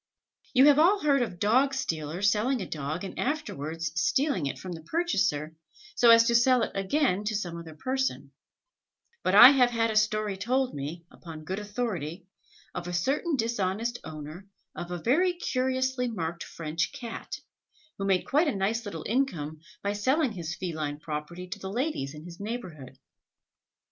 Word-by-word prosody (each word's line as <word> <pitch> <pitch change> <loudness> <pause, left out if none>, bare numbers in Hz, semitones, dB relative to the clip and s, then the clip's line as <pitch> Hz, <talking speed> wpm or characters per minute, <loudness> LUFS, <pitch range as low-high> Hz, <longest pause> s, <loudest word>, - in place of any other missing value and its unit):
You 260 +2 +7
have 290 0 +6
all 385 +6 +5
heard 280 -3 +3
of 220 -7 -3
dog 255 +8 +3
stealers 170 - 0
selling 240 +5 +1
a 190 - -3
dog 155 +4 -4
and 195 - -7
afterwards 165 - -3
stealing 180 - +1
it 130 - -4
from 185 +7 -7
the 165 -2 -6
purchaser, 160 - 0 0.4
so 240 - +5
as 230 0 +9
to 235 0 +1
sell 240 +1 +4
it - - -2
again 200 +1 +1
to 215 +1 -1
some 175 -5 -3
other 165 -2 -9
person; 265 +10 -2 0.9
but 185 - +2
I 245 +5 +12
have 255 -3 +4
had 230 -1 +1
a - - -4
story 215 -2 +1
told 255 +6 0
me, 150 +4 -6
upon 160 -2 -10
good 190 +5 -4
authority, 205 - -4 0.5
of 175 -1 -5
a 175 - -4
certain 275 - 0
dishonest 230 -1 -1
owner 155 +4 -8 0.3
of 175 - -6
a 180 - -3
very 315 - +2
curiously 260 -5 -1
marked 170 -7 -4
French 160 0 -3
Cat, 240 -5 -6 0.6
who 195 - -2
made 190 -2 +2
quite 305 +5 +2
a 285 - 0
nice 215 +4 -1
little 165 -6 -6
income 175 - -1 0.2
by 200 0 0
selling 260 +7 +1
his 175 -4 -5
feline 155 -5 -4
property 155 +4 -6
to 205 +2 -6
the 190 - -6
ladies 225 - -2
in 150 +2 -10
his 175 0 -10
neighbourhood. 180 - -6
205 Hz, 170 wpm, -28 LUFS, 165-255 Hz, 0.9 s, I